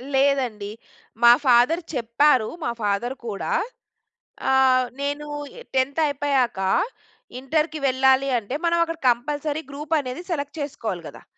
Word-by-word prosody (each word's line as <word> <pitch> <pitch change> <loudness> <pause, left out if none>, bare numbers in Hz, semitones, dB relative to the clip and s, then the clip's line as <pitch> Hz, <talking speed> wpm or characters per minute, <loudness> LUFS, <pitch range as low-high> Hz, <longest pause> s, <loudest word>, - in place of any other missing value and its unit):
లేదండి. 260 -7 +1 0.5
మా 235 - +10
ఫాదర్ 250 +8 +4
చెప్పారు. 245 0 +2 0.2
మా - - 0
ఫాదర్ 210 +5 -1
కూడా 200 -3 -3 1.0
అహ్, 260 -1 +4
నేను 290 +1 -3 0.5
10థ్ 265 +3 +1
అయిపోయాక, 280 -6 0 0.8
ఇంటర్‌కి 305 +4 -1
వెళ్ళాలి. 265 +1 +3
అంటే, 230 +3 -6
మనం 340 0 +3
అక్కడ 330 -1 -6
కంపల్సరీ 290 +5 0
గ్రూప్ 295 +3 -8
అనేది 260 +3 -5
సెలెక్ట్ 290 -1 -3
చేసుకోవాలి 230 -11 -4
కదా! - - -11
265 Hz, 115 wpm, -23 LUFS, 245-290 Hz, 1.0 s, మా